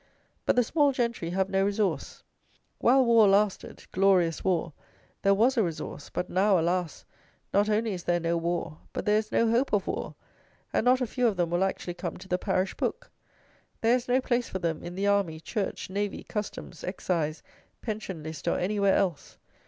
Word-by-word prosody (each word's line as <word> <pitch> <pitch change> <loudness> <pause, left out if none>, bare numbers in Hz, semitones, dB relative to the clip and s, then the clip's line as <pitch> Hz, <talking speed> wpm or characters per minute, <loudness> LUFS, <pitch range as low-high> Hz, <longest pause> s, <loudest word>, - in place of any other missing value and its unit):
But - - +4
the 245 - +4
small 290 +3 +3
gentry 235 -9 -1
have 190 +2 0
no 195 0 +1
resource. 200 0 -1 0.6
While 260 +2 +5
war 230 -3 +6
lasted, 200 0 +1
"glorious 185 -4 +3
war," 170 -4 0 0.5
there 195 0 +4
was 245 +6 +3
a 225 - +4
resource; 165 -3 -5
but 180 - -3
now, 195 +1 +3
alas! 175 -1 -1 0.5
not 205 +2 +3
only 215 0 +1
is 180 -2 -6
there 175 0 +2
no 170 0 0
war, 170 -2 -2
but - - -4
there 210 0 +4
is 215 0 -6
no 230 - +3
hope 245 +4 +2
of 200 -2 +2
war; - - -4 0.6
and - - +1
not 255 +1 +4
a - - +2
few 245 +1 +1
of 210 -5 0
them 170 -2 0
will 175 +2 +2
actually 190 -2 -2
come 175 - -5
to - - -12
the 180 0 0
parish 190 -1 0
book. - - -3 0.7
There 230 +1 +4
is 250 0 -3
no 250 +1 +3
place 245 -1 0
for - - -3
them 165 -3 -2
in 175 +1 -7
the 195 +2 -1
army, 200 -6 +1
church, 200 +5 -3
navy, 200 +1 -3
customs, 205 -5 -6
excise, 170 -4 -2 0.4
pension 205 -7 -5
list, 155 0 -7
or - - +2
anywhere 200 +1 +2
else. 180 -7 -1
195 Hz, 190 wpm, -28 LUFS, 175-220 Hz, 0.7 s, war